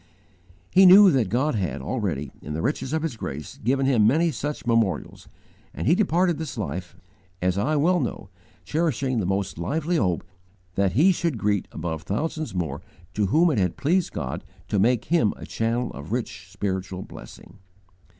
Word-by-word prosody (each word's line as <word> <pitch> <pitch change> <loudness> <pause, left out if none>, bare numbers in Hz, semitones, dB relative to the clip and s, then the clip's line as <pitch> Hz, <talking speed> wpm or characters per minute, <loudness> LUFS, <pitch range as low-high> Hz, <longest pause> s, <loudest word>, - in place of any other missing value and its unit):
"He 190 +1 +7
knew 195 +1 +9
that 125 - +1
God 135 +8 +1
had, 95 -6 -2
already, 75 - -3
in 75 - -6
the 80 - -3
riches 135 +1 -1
of 160 0 -1
His 160 -7 -2
grace, 75 -8 -7
given 135 +4 +2
him 120 -6 +4
many 160 +7 +3
such 145 +2 -4
memorials; 115 -5 0 0.5
and - - -4
he 150 - +5
departed 180 -3 +2
this 150 -4 -5
life, 90 -2 -4 0.4
as 90 0 +1
I 130 +11 0
well 175 +5 +3
know, 120 - -4 0.4
cherishing 140 - 0
the 95 - -1
most 95 -2 -2
lively 160 - -1
hope 90 - 0 0.5
that 95 0 +1
he 165 - +5
should 170 -6 -1
greet 105 -2 0
above 80 -2 -4
thousands 155 - -3
more 80 -6 -2 0.3
to 105 +1 +1
whom 165 - +4
it 125 - +1
had 90 -2 0
pleased 175 +5 +1
God - - -4 0.3
to 100 - +1
make 120 +3 +2
him 150 -11 +2
a - - -9
channel 115 +2 -1
of 70 +5 -9
rich 110 -6 -4
spiritual 95 -2 -3
blessing. - - -13
115 Hz, 175 wpm, -24 LUFS, 95-155 Hz, 0.5 s, knew